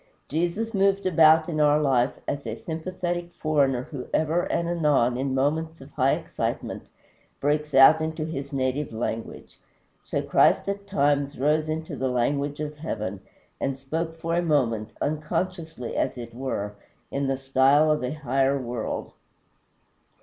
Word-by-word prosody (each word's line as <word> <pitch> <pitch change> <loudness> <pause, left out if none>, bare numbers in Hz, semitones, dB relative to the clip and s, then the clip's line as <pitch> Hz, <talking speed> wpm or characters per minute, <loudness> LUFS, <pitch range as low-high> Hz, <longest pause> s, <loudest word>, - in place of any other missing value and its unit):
Jesus 175 +8 -1
moved 195 0 +2
about 160 -2 +5
in 155 -3 -2
our 150 0 +5
life 135 -4 +2
as 140 -3 -3
a 110 - -3
sympathetic 175 +3 -4
foreigner 140 -6 +1
who 130 -2 -7
ever 160 +3 +1
and 170 - 0
anon 150 -8 +2
in 135 +1 -1
moments 160 +4 0
of 135 +2 -13
high 135 -1 +2
excitement - - -4 0.5
breaks 150 0 0
out 145 +4 +8
into 160 0 -2
his 140 -3 -5
native 135 +1 -1
language. 115 0 -5 0.4
So - - -3
Christ - - +3
at 200 0 -3
times 145 -5 +1
rose 155 +3 +1
into 160 +1 -3
the 130 0 -1
language 140 +4 0
of 150 0 -4
heaven, 105 -10 -4 0.4
and 135 -1 -1
spoke 160 +4 -4
for 165 +1 -2
a 175 - +2
moment, 120 -10 +1
unconsciously 160 -2 -3
as - - -1
it 115 -1 -8
were, 115 -5 -3 0.4
in 140 0 -1
the 135 0 0
style 135 +3 +4
of 150 -3 0
a 125 - -1
higher 135 -2 +1
world. 120 -3 -4
145 Hz, 150 wpm, -25 LUFS, 135-160 Hz, 0.5 s, out